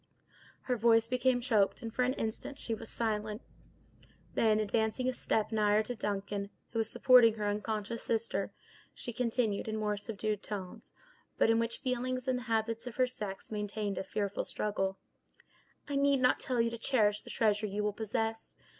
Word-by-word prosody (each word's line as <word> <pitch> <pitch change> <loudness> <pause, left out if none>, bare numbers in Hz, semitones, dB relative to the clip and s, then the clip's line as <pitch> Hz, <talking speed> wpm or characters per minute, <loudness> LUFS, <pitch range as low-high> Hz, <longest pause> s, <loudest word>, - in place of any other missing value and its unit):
Her 250 - -1
voice 230 0 +4
became 250 0 +2
choked, 220 -2 +2
and, 225 -1 -5
for 255 - 0
an 250 +1 +2
instant, 225 +5 -4
she 230 - -3
was 225 0 -5
silent; 215 -1 -2 0.9
then, 215 -1 +3
advancing 220 +4 0
a 255 - +1
step 220 -3 0
nigher 210 -1 +3
to 245 - -4
Duncan, 200 -2 -3 0.2
who 230 - -1
was 220 -1 +2
supporting 245 -4 +6
her 210 -2 -2
unconscious 210 +2 -2
sister, 230 0 -1 0.4
she 240 - -5
continued, 230 -4 0
in 220 0 -2
more 210 -1 0
subdued 210 0 -3
tones, 195 -4 -6 0.5
but 225 - +4
in 225 - +3
which 230 0 -1
feeling 255 -1 -1
and 255 -1 +1
the 245 -1 -10
habits 225 +1 0
of 245 - -6
her 255 - +4
sex 210 -6 -6
maintained 210 -1 -2
a - - -2
fearful 200 0 -2
struggle: 195 -2 -2 0.9
"I 285 -1 -1
need 280 -1 +4
not 250 0 +4
tell 250 -2 -1
you 230 0 +2
to 235 - -6
cherish 210 -5 +2
the - - -12
treasure 215 -1 +2
you 205 +1 -2
will 210 0 0
possess. 225 +1 -3
220 Hz, 180 wpm, -32 LUFS, 210-240 Hz, 0.9 s, supporting